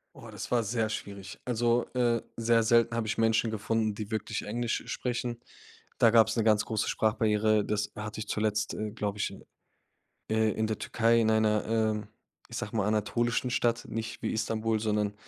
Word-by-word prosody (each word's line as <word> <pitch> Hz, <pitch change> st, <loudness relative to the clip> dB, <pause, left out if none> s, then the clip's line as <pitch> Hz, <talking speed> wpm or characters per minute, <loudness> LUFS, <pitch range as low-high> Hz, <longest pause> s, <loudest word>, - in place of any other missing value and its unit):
Oh, -, -, -11 dB
das -, -, -7 dB
war 120 Hz, -1 st, +3 dB
sehr 110 Hz, +1 st, -1 dB
schwierig. 100 Hz, -2 st, -7 dB
Also, 120 Hz, 0 st, +1 dB
äh, 120 Hz, -2 st, +2 dB, 0.2 s
sehr 115 Hz, 0 st, +3 dB
selten 115 Hz, +1 st, +3 dB
habe 115 Hz, -2 st, -1 dB
ich 110 Hz, -, -2 dB
Menschen 115 Hz, 0 st, +2 dB
gefunden, 110 Hz, 0 st, -1 dB
die 105 Hz, +1 st, -6 dB
wirklich 110 Hz, 0 st, -2 dB
Englisch 120 Hz, +2 st, -2 dB
sprechen. 120 Hz, -1 st, -3 dB, 0.6 s
Da 115 Hz, -, +5 dB
gab's 115 Hz, 0 st, +5 dB
'ne 115 Hz, -, +2 dB
ganz 110 Hz, -1 st, +3 dB
große 110 Hz, -2 st, -1 dB
Sprachbarriere. 110 Hz, -1 st, +2 dB
Das 105 Hz, -1 st, -1 dB
hatte 105 Hz, +1 st, -6 dB
ich 105 Hz, -, -5 dB
zuletzt, 105 Hz, -1 st, -1 dB
äh, 105 Hz, -1 st, -3 dB
glaube 105 Hz, -2 st, -3 dB
ich, -, -, -1 dB
in -, -, -12 dB, 0.9 s
äh, 110 Hz, 0 st, +2 dB
in 110 Hz, -, -1 dB
der 110 Hz, -, -2 dB
Türkei 115 Hz, 0 st, +2 dB
in 110 Hz, -, +2 dB
einer, 110 Hz, -1 st, +3 dB
ähm, 110 Hz, -2 st, 0 dB, 0.4 s
ich -, -, -6 dB
sage 105 Hz, -, -5 dB
mal, 105 Hz, -3 st, +1 dB
anatolischen 120 Hz, +4 st, 0 dB
Stadt, 120 Hz, -1 st, +1 dB
nicht 115 Hz, 0 st, -5 dB
wie -, -, 0 dB
Istanbul, 110 Hz, 0 st, 0 dB
sondern 105 Hz, -1 st, 0 dB
110 Hz, 185 wpm, -29 LUFS, 105-115 Hz, 0.9 s, Da